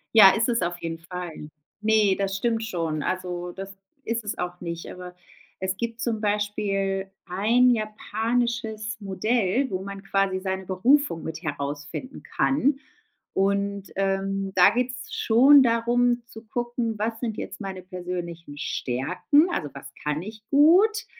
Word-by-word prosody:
Ja, 200 Hz, -3 st, +10 dB
ist 230 Hz, +2 st, +1 dB
es 235 Hz, -4 st, +1 dB
auf 175 Hz, 0 st, -1 dB
jeden 165 Hz, 0 st, -4 dB
Fall. 165 Hz, -2 st, -7 dB, 0.3 s
Ne, 215 Hz, -2 st, +3 dB
das 195 Hz, -1 st, -1 dB
stimmt 225 Hz, +2 st, 0 dB
schon, 165 Hz, -7 st, -2 dB
also 180 Hz, 0 st, -3 dB
das 195 Hz, +1 st, -8 dB, 0.3 s
ist 230 Hz, 0 st, -2 dB
es 210 Hz, -, -3 dB
auch 180 Hz, 0 st, -4 dB
nicht, 170 Hz, -1 st, -5 dB
aber 180 Hz, 0 st, -9 dB, 0.5 s
es 190 Hz, 0 st, -1 dB
gibt 230 Hz, +2 st, -4 dB
zum 225 Hz, -2 st, -1 dB
Beispiel 200 Hz, -2 st, -1 dB, 0.2 s
ein 220 Hz, +7 st, +3 dB
japanisches 220 Hz, 0 st, -1 dB
Modell, 215 Hz, +5 st, 0 dB
wo 185 Hz, 0 st, -2 dB
man 200 Hz, 0 st, -7 dB
quasi 195 Hz, -1 st, 0 dB
seine 190 Hz, 0 st, -3 dB
Berufung 195 Hz, -, +2 dB
mit 160 Hz, +1 st, -6 dB
herausfinden 145 Hz, -, -5 dB
kann. 275 Hz, 0 st, +1 dB, 0.6 s
Und, 200 Hz, 0 st, 0 dB
ähm, 195 Hz, 0 st, -1 dB
da 180 Hz, -, +8 dB
geht's 250 Hz, +1 st, -3 dB
schon 265 Hz, +5 st, +6 dB
darum 240 Hz, +1 st, +2 dB
zu 220 Hz, -1 st, -12 dB
gucken, 240 Hz, -1 st, -2 dB
was 225 Hz, +2 st, -2 dB
sind 225 Hz, -4 st, -3 dB
jetzt -, -, -6 dB
meine 190 Hz, -2 st, -5 dB
persönlichen 175 Hz, -4 st, -6 dB
Stärken? 145 Hz, -, +1 dB
Also, 160 Hz, -, -2 dB
was 140 Hz, 0 st, -10 dB
kann 150 Hz, +1 st, -1 dB
ich 215 Hz, +2 st, -9 dB
gut? 370 Hz, +10 st, +5 dB
200 Hz, 145 wpm, -25 LUFS, 180-230 Hz, 0.6 s, Ja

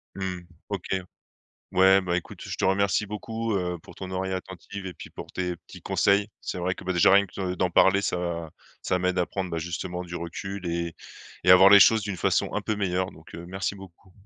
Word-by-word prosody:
Mmh, 95 Hz, -2 st, -4 dB, 0.3 s
OK, 100 Hz, -3 st, -4 dB, 0.9 s
ouais, 95 Hz, +1 st, +6 dB
bah, 90 Hz, -1 st, -1 dB
écoute, 90 Hz, -, -6 dB
je -, -, -5 dB
te -, -, -1 dB
remercie 100 Hz, +2 st, +2 dB
beaucoup, 110 Hz, +2 st, -4 dB
heu, 90 Hz, -2 st, -1 dB
pour -, -, -14 dB
ton 95 Hz, -1 st, -7 dB
oreille 95 Hz, 0 st, -2 dB
attentive 95 Hz, +1 st, -6 dB
et 90 Hz, -, -6 dB
puis -, -, -11 dB
pour -, -, -9 dB
tes 90 Hz, -1 st, -2 dB
petits 80 Hz, -, -14 dB
conseils. 100 Hz, +1 st, +2 dB
C'est -, -, -5 dB
vrai 90 Hz, +1 st, -1 dB
que, -, -, -11 dB
bah, 95 Hz, -, 0 dB
déjà, 85 Hz, +2 st, +5 dB
rien 100 Hz, 0 st, +6 dB
que 95 Hz, 0 st, -4 dB
d 90 Hz, -, -3 dB
d'en 90 Hz, 0 st, +1 dB
parler 95 Hz, +3 st, +5 dB
ça 85 Hz, -3 st, -2 dB, 0.3 s
ça 90 Hz, -, 0 dB
m'aide 90 Hz, 0 st, 0 dB
à 90 Hz, -, +2 dB
prendre, 95 Hz, -2 st, -4 dB
bah, 85 Hz, -, -2 dB
justement 90 Hz, +2 st, -4 dB
du 85 Hz, 0 st, -6 dB
recul 95 Hz, +3 st, -6 dB
et 85 Hz, -1 st, -2 dB, 0.5 s
et 90 Hz, -, +5 dB
à 90 Hz, -, +11 dB
voir 95 Hz, +2 st, +8 dB
les 100 Hz, -1 st, +9 dB
choses 110 Hz, +2 st, +6 dB
d'une 100 Hz, -2 st, -4 dB
façon -, -, +1 dB
un -, -, 0 dB
peu 110 Hz, -, -1 dB
meilleure, 95 Hz, -1 st, -1 dB
donc 80 Hz, -, -15 dB
heu, 85 Hz, -, -7 dB
merci 95 Hz, +2 st, -3 dB
beaucoup. 95 Hz, -1 st, -14 dB
95 Hz, 225 wpm, -26 LUFS, 90-100 Hz, 0.9 s, à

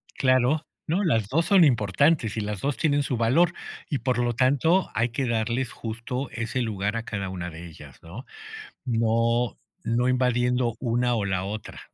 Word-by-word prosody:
Claro, 130 Hz, +4 st, +2 dB, 0.2 s
no, 180 Hz, +6 st, +1 dB
las 115 Hz, -, +1 dB
2 165 Hz, +4 st, +1 dB
son 190 Hz, -4 st, +6 dB
importantes, 120 Hz, -, +2 dB
y -, -, 0 dB
las 105 Hz, -2 st, -4 dB
2 140 Hz, -1 st, -1 dB
tienen 145 Hz, -2 st, +2 dB
su 125 Hz, -3 st, -2 dB
valor, 155 Hz, +10 st, +3 dB, 0.4 s
y, 145 Hz, -, -1 dB
por 125 Hz, -2 st, 0 dB
lo 120 Hz, 0 st, +1 dB
tanto, 140 Hz, +9 st, +2 dB
hay 115 Hz, +2 st, +1 dB
que 125 Hz, +2 st, -2 dB
darles 115 Hz, +2 st, -1 dB
justo 115 Hz, +4 st, -5 dB
ese 115 Hz, +2 st, -3 dB
lugar 105 Hz, -2 st, -2 dB
a 115 Hz, -, -3 dB
cada 100 Hz, -4 st, -4 dB
una 90 Hz, -1 st, -5 dB
de 85 Hz, +1 st, -9 dB
ellas, 75 Hz, -5 st, -13 dB
¿no? 95 Hz, -, -10 dB, 0.6 s
No, 115 Hz, -1 st, +1 dB, 0.3 s
no 120 Hz, +2 st, +1 dB
invadiendo 125 Hz, -1 st, +1 dB
una, 120 Hz, 0 st, +1 dB
o, 110 Hz, -3 st, -1 dB
la 95 Hz, -1 st, -1 dB
otra. 105 Hz, +2 st, -6 dB
120 Hz, 175 wpm, -25 LUFS, 110-130 Hz, 0.6 s, son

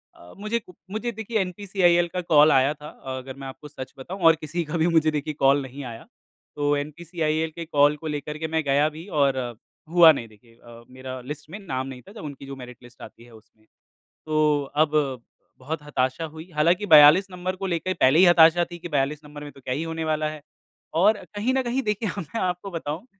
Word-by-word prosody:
अ, 90 Hz, -, -15 dB
मुझे 215 Hz, +3 st, -2 dB
कु 180 Hz, -4 st, -17 dB, 0.2 s
मुझे 230 Hz, +3 st, -3 dB
देखिए 220 Hz, 0 st, -3 dB
एनपीसीआईएल 180 Hz, -2 st, +1 dB
का 180 Hz, -, -1 dB
कॉल 150 Hz, +1 st, +7 dB
आया 135 Hz, +2 st, +4 dB
था। 150 Hz, 0 st, -11 dB, 0.3 s
अगर 130 Hz, +1 st, -8 dB
मैं 135 Hz, -, -7 dB
आपको 135 Hz, +3 st, -10 dB
सच 130 Hz, -3 st, -9 dB
बताऊँ 180 Hz, +8 st, -8 dB
और 165 Hz, 0 st, +8 dB
किसी 165 Hz, +3 st, -3 dB
का 160 Hz, +3 st, -3 dB
भी 160 Hz, +2 st, +2 dB
मुझे 160 Hz, -2 st, +3 dB
देखिए 150 Hz, 0 st, -3 dB
कॉल 140 Hz, +1 st, +4 dB
नहीं 135 Hz, +1 st, -8 dB
आया 115 Hz, -, -12 dB, 0.5 s
तो 145 Hz, 0 st, +1 dB
एनपीसीआईएल 160 Hz, +1 st, -2 dB
के 170 Hz, -1 st, -6 dB
कॉल 145 Hz, -1 st, +3 dB
को 160 Hz, +1 st, -7 dB
लेकर 150 Hz, 0 st, -4 dB
के 160 Hz, -, -3 dB
मैं 160 Hz, -, +1 dB
गया 145 Hz, +2 st, +2 dB
भी 165 Hz, +5 st, -10 dB
और 135 Hz, -1 st, +3 dB
अ, 120 Hz, -2 st, -3 dB, 0.4 s
हुआ 170 Hz, -1 st, +8 dB
नहीं 120 Hz, -6 st, -4 dB
देखिए 115 Hz, +2 st, -22 dB
अ, 115 Hz, 0 st, -15 dB
मेरा 130 Hz, 0 st, -8 dB
लिस्ट 145 Hz, +3 st, -8 dB
में 205 Hz, +5 st, -8 dB
नाम 130 Hz, -9 st, -4 dB
नहीं 130 Hz, -2 st, -9 dB
था -, -, -12 dB
जब 215 Hz, -, -10 dB
उनकी 140 Hz, -2 st, -8 dB
जो 135 Hz, 0 st, -7 dB
मेरिट 125 Hz, -2 st, -11 dB
लिस्ट 120 Hz, 0 st, -17 dB
आती 115 Hz, -, -12 dB
है 120 Hz, -, -17 dB
उसमें। 110 Hz, 0 st, -20 dB, 0.6 s
तो 150 Hz, -2 st, +2 dB
अब 150 Hz, 0 st, +3 dB, 0.7 s
बहुत 150 Hz, +4 st, -5 dB
हताशा 135 Hz, +1 st, -1 dB
हुई, 160 Hz, +3 st, -10 dB
हालाँकि 170 Hz, +7 st, +2 dB
42 155 Hz, +5 st, +8 dB
नंबर 180 Hz, +1 st, -4 dB
को 195 Hz, +1 st, -4 dB
लेकर 185 Hz, +1 st, -1 dB
पहले 135 Hz, +2 st, +4 dB
ही 190 Hz, -, +8 dB
हताशा 175 Hz, 0 st, +6 dB
थी 175 Hz, -, -7 dB
कि 175 Hz, -, -7 dB
42 145 Hz, 0 st, -1 dB
नंबर 150 Hz, 0 st, -10 dB
में 145 Hz, -, -8 dB
तो 135 Hz, -, -17 dB
क्या 125 Hz, 0 st, -3 dB
ही 150 Hz, -, -2 dB
होने 165 Hz, 0 st, -4 dB
वाला 155 Hz, -1 st, 0 dB
है? 155 Hz, -1 st, -9 dB, 0.5 s
और 205 Hz, +6 st, +4 dB, 0.2 s
कहीं 225 Hz, +5 st, 0 dB
न 265 Hz, -, +2 dB
कहीं 250 Hz, +3 st, -1 dB
देखिए 210 Hz, -1 st, -1 dB
मैं 175 Hz, +7 st, -5 dB
आपको 180 Hz, +1 st, -3 dB
बताऊँ 165 Hz, +4 st, -5 dB
155 Hz, 220 wpm, -24 LUFS, 140-175 Hz, 0.7 s, और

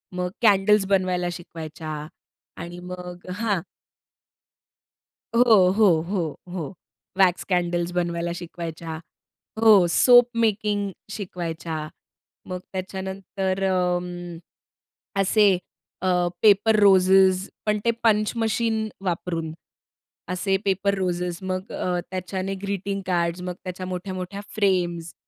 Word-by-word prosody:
मग 180 Hz, 0 st, -1 dB
कॅन्डल्स 210 Hz, -2 st, +4 dB
बनवायला 185 Hz, -2 st, +1 dB
शिकवायच्या 155 Hz, -3 st, -7 dB, 0.5 s
आणि 175 Hz, +1 st, -7 dB
मग 180 Hz, 0 st, -8 dB
हां. 205 Hz, -6 st, 0 dB, 1.7 s
हो, 235 Hz, -1 st, +6 dB, 0.2 s
हो, 220 Hz, -, +6 dB, 0.2 s
हो, 195 Hz, -2 st, 0 dB, 0.3 s
हो. 180 Hz, -3 st, -3 dB, 0.5 s
वॅक्स 185 Hz, -2 st, +4 dB
कॅन्डल्स 175 Hz, -2 st, 0 dB
बनवायला 170 Hz, -1 st, -1 dB
शिकवायच्या. 165 Hz, -2 st, -6 dB, 0.6 s
हो, 215 Hz, -5 st, +7 dB
सोप 245 Hz, +7 st, +6 dB, 0.2 s
मेकिंग 205 Hz, -2 st, 0 dB, 0.2 s
शिकवायच्या, 170 Hz, -5 st, -5 dB, 0.7 s
मग 180 Hz, 0 st, -3 dB
त्याच्यानंतर 190 Hz, 0 st, -3 dB
अं, 175 Hz, -1 st, -1 dB, 0.9 s
असे 205 Hz, +1 st, +4 dB, 0.5 s
अ, 185 Hz, -, +1 dB, 0.3 s
पेपर 215 Hz, +1 st, +5 dB
रोजेस 190 Hz, -1 st, +5 dB, 0.2 s
पण 210 Hz, 0 st, +2 dB
ते 235 Hz, -, +4 dB
पंच 215 Hz, -2 st, +3 dB
मशीन 225 Hz, -1 st, 0 dB, 0.2 s
वापरून, 170 Hz, -3 st, -2 dB, 0.8 s
असे 195 Hz, +2 st, 0 dB
पेपर 195 Hz, +1 st, +1 dB
रोज 180 Hz, -2 st, -1 dB, 0.2 s
मग 185 Hz, +1 st, -4 dB
अ, 180 Hz, -1 st, -1 dB
त्याच्याने 185 Hz, +1 st, -3 dB
ग्रीटिंग 200 Hz, 0 st, -2 dB
कार्ड्स, 175 Hz, -1 st, 0 dB
मग 180 Hz, 0 st, -4 dB
त्याच्या 185 Hz, 0 st, -5 dB
मोठ्या-मोठ्या 185 Hz, +1 st, -5 dB
फ्रेम्स, 175 Hz, -5 st, 0 dB
185 Hz, 100 wpm, -24 LUFS, 175-200 Hz, 1.7 s, हो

